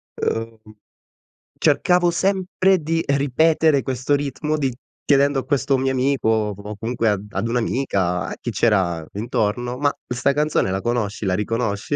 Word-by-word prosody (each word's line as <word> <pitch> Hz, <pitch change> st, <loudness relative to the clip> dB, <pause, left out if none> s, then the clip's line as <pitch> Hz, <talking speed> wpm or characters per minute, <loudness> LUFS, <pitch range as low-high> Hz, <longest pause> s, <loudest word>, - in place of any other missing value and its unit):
ehm, 115 Hz, 0 st, -2 dB, 1.0 s
cercavo 180 Hz, -1 st, +3 dB
sempre 190 Hz, 0 st, +1 dB
di 165 Hz, +1 st, -1 dB
ripetere 145 Hz, +2 st, +2 dB
questo 130 Hz, +2 st, 0 dB
ritmo 145 Hz, +2 st, -2 dB
di 135 Hz, -4 st, -1 dB, 0.3 s
chiedendo 140 Hz, -1 st, +3 dB
a 130 Hz, -, -6 dB
questo 140 Hz, -1 st, +1 dB
mio 135 Hz, 0 st, 0 dB
amico 130 Hz, -2 st, +1 dB
o 105 Hz, -2 st, +1 dB
o 105 Hz, +1 st, -7 dB
comunque 115 Hz, 0 st, -1 dB
ad 100 Hz, -1 st, -1 dB
ad 100 Hz, +4 st, -2 dB
un'amica, 100 Hz, -, 0 dB
a -, -, -5 dB
chi -, -, -3 dB
c'era 90 Hz, -8 st, +1 dB
intorno: 120 Hz, +3 st, -2 dB
"Ma, 145 Hz, +1 st, +2 dB, 0.2 s
'sta 125 Hz, +3 st, 0 dB
canzone 150 Hz, -9 st, +1 dB
la 95 Hz, +1 st, -2 dB
conosci, 115 Hz, -3 st, -2 dB
la 90 Hz, -1 st, +1 dB
riconosci?" 110 Hz, +3 st, -2 dB
125 Hz, 150 wpm, -21 LUFS, 105-145 Hz, 1.0 s, cercavo